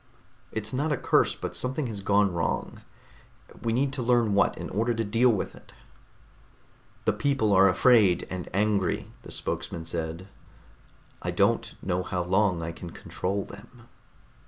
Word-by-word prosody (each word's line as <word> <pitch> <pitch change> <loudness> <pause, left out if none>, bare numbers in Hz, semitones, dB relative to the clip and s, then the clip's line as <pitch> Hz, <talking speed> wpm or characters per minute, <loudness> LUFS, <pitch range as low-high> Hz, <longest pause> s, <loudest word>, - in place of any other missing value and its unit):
"It's 110 +1 -3
not 145 +4 0
a 145 - +1
curse, - - +2
but - - -5
something 130 +3 -1
has 110 -4 -5
gone 100 -1 +3
wrong. 85 -1 -2 0.8
We 115 - -1
need 135 +4 +1
to 130 - -3
learn 120 -3 +3
what, 100 - +3
in - - -5
order 115 +4 0
to 115 - 0
deal 115 +4 +3
with 110 -5 -1
it." - - -16 1.3
"The 110 - +3
people 110 -1 +1
are 95 +1 +7
afraid 100 -1 +4
and 90 -2 -5
angry," 100 -1 0
the - - -12
spokesman 80 -1 -3
said. 85 +2 -4 0.9
"I - - -3
don't - - +1
know 90 -1 0
how 90 -1 -2
long 95 -1 +2
I 85 - -3
can 85 +1 -9
control 95 +4 -3
them." 120 +4 -14
105 Hz, 160 wpm, -27 LUFS, 90-120 Hz, 1.3 s, are